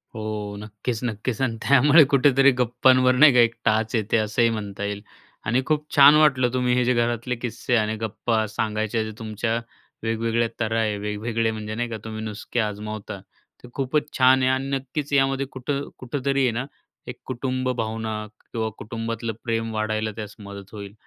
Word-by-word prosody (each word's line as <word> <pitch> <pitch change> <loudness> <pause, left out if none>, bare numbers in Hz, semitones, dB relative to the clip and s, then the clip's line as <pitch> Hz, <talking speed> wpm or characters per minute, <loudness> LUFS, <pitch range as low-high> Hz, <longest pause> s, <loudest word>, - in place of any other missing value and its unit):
हो, 105 -2 -4
नक्कीच 105 +2 -5
नक्कीच 110 0 -3
आणि 125 -4 0
त्यामुळे 145 +3 +6
कुठेतरी 135 0 +5
गप्पांवर 130 +1 +4
नाही 145 +1 +7
का 125 - +5
एक 115 -1 +4
टाच 110 0 +1
येते 110 0 +1
असंही 110 +2 +2
म्हणता 100 -3 -5
येईल. 100 0 -3 0.4
आणि 120 +5 +2
खूप 150 0 0
छान 145 +1 +9
वाटलं, 135 -5 +4
तुम्ही 125 -1 +1
हे 125 - +2
जे 125 - +3
घरातले 120 +1 0
किस्से 120 +1 -2
आणि 110 -1 +1
गप्पा 110 +1 -1
सांगायचे, 110 +1 -1
जे 110 - -6
तुमच्या 110 +1 -2 0.5
वेगवेगळ्या 115 +1 0
तऱ्हा 115 0 0
आहे, 105 -2 0
वेगवेगळे 110 +2 -2
म्हणजे 110 -1 -5
नाही 120 +1 -2
का, 110 - -4
तुम्ही 110 -1 -6
नुसके 110 +2 -4
आजमावता 105 -1 -4 0.4
ते - - -10
खूपच 145 +2 -1
छान 130 0 +5
आहे 130 - +3
आणि 130 +1 -1
नक्कीच 135 +2 -4
यामध्ये 135 0 +2
कुठं 140 +2 -3
कुठेतरी 135 +2 -1
आहे 125 - +3
ना, 120 +3 -3 0.4
एक - - -7
कुटुंब 130 0 -2
भावना 110 -2 -3 0.3
किंवा 110 -1 -2
कुटुंबातलं 115 +1 -4
प्रेम 115 -1 -2
वाढायला 110 0 -1
त्यास 105 -2 -7
मदत 100 -1 -10
होईल. 100 -2 -8
115 Hz, 170 wpm, -24 LUFS, 110-130 Hz, 0.5 s, छान